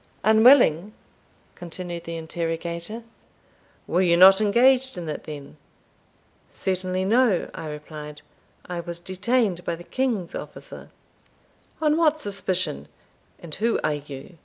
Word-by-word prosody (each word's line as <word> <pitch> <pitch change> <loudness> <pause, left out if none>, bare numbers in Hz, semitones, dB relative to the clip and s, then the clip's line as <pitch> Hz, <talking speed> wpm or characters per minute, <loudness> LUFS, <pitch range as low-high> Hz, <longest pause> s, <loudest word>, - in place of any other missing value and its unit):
"Unwilling!" 220 - +5 0.6
continued 175 -1 -7
the 165 0 -5
interrogator. 170 +5 -4 0.8
"Were 180 - +1
you 170 -2 +3
not 190 +3 +8
engaged 255 +3 +3
in 170 -2 -5
it 155 - -5
then?" 145 - -9 0.9
"Certainly 185 0 -2
no," 225 -3 +2
I 160 - -7
replied; 150 0 -9 0.4
"I 175 -1 -5
was 170 0 -6
detained 190 +1 -1
by 170 - -2
the 170 - -12
king's 230 -7 -2
officer." - - -9 0.9
"On 305 0 +3
what 310 -2 +3
suspicion? 185 - -3 0.5
and 170 -3 -11
who 225 +6 0
are - - +1
you? 145 +3 -9
180 Hz, 120 wpm, -24 LUFS, 165-220 Hz, 0.9 s, not